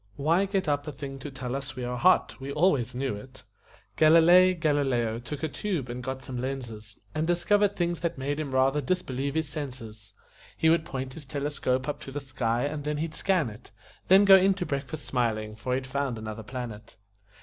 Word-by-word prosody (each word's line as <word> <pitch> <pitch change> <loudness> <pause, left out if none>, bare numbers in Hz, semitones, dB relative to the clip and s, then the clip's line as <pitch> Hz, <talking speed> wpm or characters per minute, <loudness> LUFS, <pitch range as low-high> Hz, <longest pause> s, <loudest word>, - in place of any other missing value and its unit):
Why 165 - +2
get 195 -2 -1
up 145 0 0
a - - -3
thing 135 0 -7
to 145 - -6
tell 130 -2 -5
us 140 0 -5
we 130 - -5
are 125 0 -2
hot? 180 +9 +3
We 135 +1 -5
always 145 -7 +2
knew 130 -1 -1
it." 130 +6 -11 0.5
Galilei 170 +4 +7
Galileo 135 -7 +1
took 140 +5 -7
a - - +2
tube 160 -6 -3
and 120 +1 -5
got 130 +1 -4
some 125 -2 -5
lenses 115 -5 -6 0.2
And 155 +1 -1
discovered 200 +4 +2
things 175 -1 -1
that 170 -2 -2
made 145 +3 -2
him 150 -2 -3
rather 135 +3 +2
disbelieve 140 -3 -2
his 160 -1 0
senses; 115 -8 -8 0.4
He 160 - +3
would 165 -1 +2
point 130 -1 -5
his 150 0 -9
telescope 135 -2 -2
up 145 - -3
to 135 - -9
the 145 - -3
sky 120 -3 -1
and 145 0 -3
then 150 0 -2
he'd 160 +1 -3
scan 170 - +1
it, 110 +4 -14 0.4
Then 195 +2 +7
go 195 -1 +9
in 190 +1 +3
to 180 -2 -3
breakfast 140 +1 -4
smiling, 110 -4 -1
for 125 +4 -2
he'd 130 0 -3
found 135 -2 -2
another 110 0 -6
planet. 115 -2 -7
140 Hz, 205 wpm, -27 LUFS, 125-160 Hz, 0.5 s, go